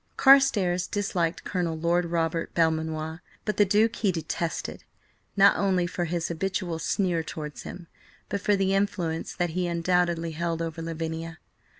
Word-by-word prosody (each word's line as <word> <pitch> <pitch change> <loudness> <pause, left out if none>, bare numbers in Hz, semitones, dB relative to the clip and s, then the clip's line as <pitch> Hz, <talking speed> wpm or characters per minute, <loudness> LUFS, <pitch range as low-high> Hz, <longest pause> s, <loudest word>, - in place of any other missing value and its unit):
Carstares 210 -11 +5
disliked 180 -5 -1
Colonel 175 -4 -2
Lord 170 +2 +1
Robert 165 -1 -1
Belmanoir, 160 0 0 0.2
but 210 - -2
the 205 - +6
Duke 215 +3 +2
he 205 -4 +2
detested, 165 0 -4 0.5
not 200 0 +7
only 190 -3 +2
for 175 0 -2
his 170 0 -2
habitual 175 -1 -2
sneer 175 0 0
towards 150 -2 -7
him, 175 - -8 0.4
but 200 - -3
for 205 0 +3
the 195 0 +1
influence 180 -5 -1
that 175 -2 -1
he 180 +1 -1
undoubtedly 170 -1 +1
held 165 +1 -2
over 165 0 -4
Lavinia. 165 0 -4
170 Hz, 150 wpm, -27 LUFS, 165-190 Hz, 0.5 s, not